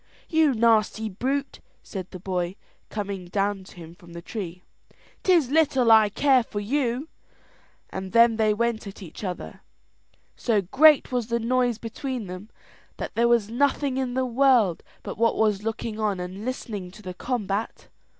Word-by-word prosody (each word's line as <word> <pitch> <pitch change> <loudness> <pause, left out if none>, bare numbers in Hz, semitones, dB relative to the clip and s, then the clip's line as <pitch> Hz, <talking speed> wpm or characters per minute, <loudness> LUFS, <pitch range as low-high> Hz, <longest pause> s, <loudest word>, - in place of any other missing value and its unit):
"You 315 -5 +3
nasty 220 -1 +2
brute," 270 +8 -2 0.2
said 185 -3 -7
the - - -8
cowboy, 180 0 -3 0.3
coming 200 -3 -4
down 195 +1 -1
to - - -15
him 165 -2 -11
from 175 -2 -16
the 170 - -7
tree, 180 -3 -6 0.6
"'tis 335 -9 +3
little 270 -6 +3
I 220 -1 +7
care 265 +4 +3
for 220 -2 -5
you;" 250 +4 -1 0.8
and 190 0 -5
then 230 -1 +5
they 215 -1 +3
went 225 0 -1
at 195 0 -9
each 170 +4 -10
other. 180 -3 -6 0.7
So 225 -4 +1
great 290 - +5
was 245 -3 -1
the 235 0 0
noise 245 0 +1
between 240 +1 -5
them 185 +3 -8 0.5
that - - -5
there 235 +1 +3
was 230 -3 +2
nothing 275 +1 +1
in 255 -2 -2
the 260 0 +1
world 245 -7 +3 0.2
but - - -7
what 230 0 +2
was 210 -2 +2
looking 220 0 -4
on 210 -3 0
and 185 +4 -6
listening 215 -7 -5
to 210 +4 -15
the 185 -1 -6
combat. 210 0 -3
220 Hz, 165 wpm, -25 LUFS, 195-250 Hz, 0.8 s, I